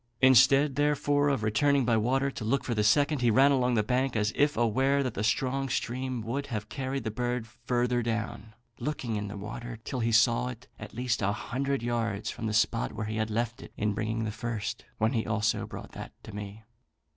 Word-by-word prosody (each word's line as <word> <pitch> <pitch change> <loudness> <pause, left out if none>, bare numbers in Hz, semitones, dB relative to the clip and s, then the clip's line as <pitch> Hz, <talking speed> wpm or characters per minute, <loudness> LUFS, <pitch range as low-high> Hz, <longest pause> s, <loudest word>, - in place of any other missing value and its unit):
Instead, 130 +2 +6
therefore, 145 0 +2
of 135 -6 0
returning 135 +5 +2
by 115 - +3
water 135 +5 +1
to 120 - -7
look 120 +6 +1
for 120 - -2
the 105 -2 +1
second, 145 +5 +3
he 120 - +4
ran 135 +5 +5
along 125 -2 +2
the 105 - +2
banks, 125 +2 0
as 105 0 +1
if 145 -2 +2
aware 130 +5 +2
that 130 -4 -2
the 105 - -3
strong 135 +4 0
stream 130 -1 -2
would 135 +6 -3
have 105 -3 -4
carried 135 -1 -3
the 110 - -2
bird 120 +1 -2
further 120 +1 -1
down; 110 -2 -4 0.2
looking 130 -7 -3
in 105 -1 -3
the 100 +1 -7
water 115 +4 -6
till 130 - -4
he 115 0 +1
saw 115 +2 +4
it, 125 -1 -8
at 110 0 -9
least 120 -1 -1
a 100 0 +2
hundred 130 +4 -2
yards 115 -3 -1
from 110 - -4
the - - -1
spot 115 +2 +1
where 105 - -4
he 110 +1 -3
had 110 0 -1
left 115 +1 -2
it - - -11
in 105 -1 0
bringing 110 +2 -2
the 110 - -2
first; 110 0 -4
when 110 +3 +1
he 115 -3 +1
also 110 0 0
brought - - -9
that - - -8
to - - -10
me. 105 +1 -7
120 Hz, 215 wpm, -29 LUFS, 110-130 Hz, 0.2 s, Instead